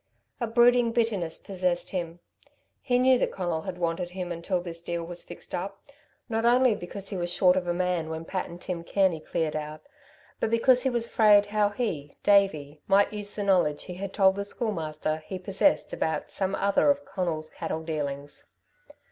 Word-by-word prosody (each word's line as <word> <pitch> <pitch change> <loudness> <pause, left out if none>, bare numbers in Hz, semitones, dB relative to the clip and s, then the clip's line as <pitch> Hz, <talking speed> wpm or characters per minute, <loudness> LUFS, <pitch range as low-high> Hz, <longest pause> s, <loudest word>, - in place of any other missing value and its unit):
A 235 - -1
brooding 240 +1 +4
bitterness 210 -9 0
possessed 180 -2 -2
him. 175 -2 -4 0.6
He 245 -2 +1
knew 255 0 +5
that - - 0
Conal 175 -4 -2
had 185 +1 -6
wanted 175 0 -2
him 180 -1 -5
until 175 +2 -1
this 170 -1 -7
deal 170 0 -3
was 175 +1 -6
fixed - - -12
up, 195 +2 -4 0.5
not 225 -2 -1
only 245 0 +5
because 195 0 -7
he 195 - -4
was 175 -1 -2
short 180 0 +4
of 185 -1 -1
a - - +1
man 180 -3 -1
when 160 0 -5
Pat 185 +2 -3
and 170 - -10
Tim 175 -2 -4
Kearney 185 -2 +1
cleared 155 0 -2
out, 155 0 -5 0.6
but - - 0
because 245 +2 +4
he 265 - +1
was 235 -2 0
afraid 210 -3 +5
how 205 0 +1
he, 190 - -4
Davey, 155 -8 +2
might 200 +2 +4
use 205 -1 -5
the 205 - -2
knowledge 175 -7 +2
he 180 - -7
had 190 +2 -5
told 190 -1 +3
the 200 - -1
Schoolmaster 160 -8 -2
he 160 +4 -7
possessed 195 +10 +1
about 160 - -2
some 195 0 -1
other 200 +8 +2
of 285 0 +1
Conal's 170 -5 -3
cattle 160 - -4
dealings. 145 -3 -5
185 Hz, 190 wpm, -27 LUFS, 165-205 Hz, 0.6 s, knew